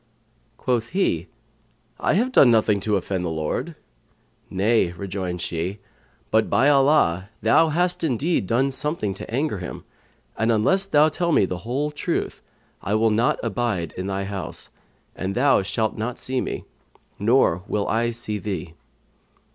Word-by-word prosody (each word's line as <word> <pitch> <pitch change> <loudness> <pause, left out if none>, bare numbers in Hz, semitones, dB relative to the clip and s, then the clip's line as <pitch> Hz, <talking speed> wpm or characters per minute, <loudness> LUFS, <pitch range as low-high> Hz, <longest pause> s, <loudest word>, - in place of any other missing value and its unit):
Quoth 120 -3 -1
he, 95 - 0 0.7
"I - - +1
have 245 +6 +1
done 140 - +6
nothing 110 -3 +3
to 105 +2 0
offend 95 -1 -2
the 85 - -2
Lord." 80 - -3 0.7
"Nay," 100 -2 +2
rejoined 90 -1 -4
she, 85 +4 -3 0.5
"but, 110 0 +3
by 135 +4 +4
Allah, 135 - +3
thou 160 +9 +5
hast 175 +3 0
indeed 150 - 0
done 130 +6 +2
something 135 -7 -2
to 95 - -9
anger 130 -3 -1
Him; 90 - -7 0.5
and 110 +1 +1
unless 185 - +3
thou 155 -5 +4
tell 170 +2 -1
me 120 - +4
the 90 -1 -4
whole 145 +4 -1
truth, 150 - -3 0.4
I 100 +2 -1
will 110 0 +3
not 115 +3 +2
abide 105 -7 -1
in 95 +1 -5
thy 100 0 -2
house, 95 -5 -6 0.4
and 95 +1 -3
thou 135 -1 +4
shalt 105 +3 -1
not 120 +3 -3
see 130 0 -2
me, - - -4 0.5
nor 105 -5 +3
will 105 -1 -1
I 115 +1 +1
see 115 -3 -4
thee." 90 -5 -5
110 Hz, 155 wpm, -23 LUFS, 95-135 Hz, 0.7 s, done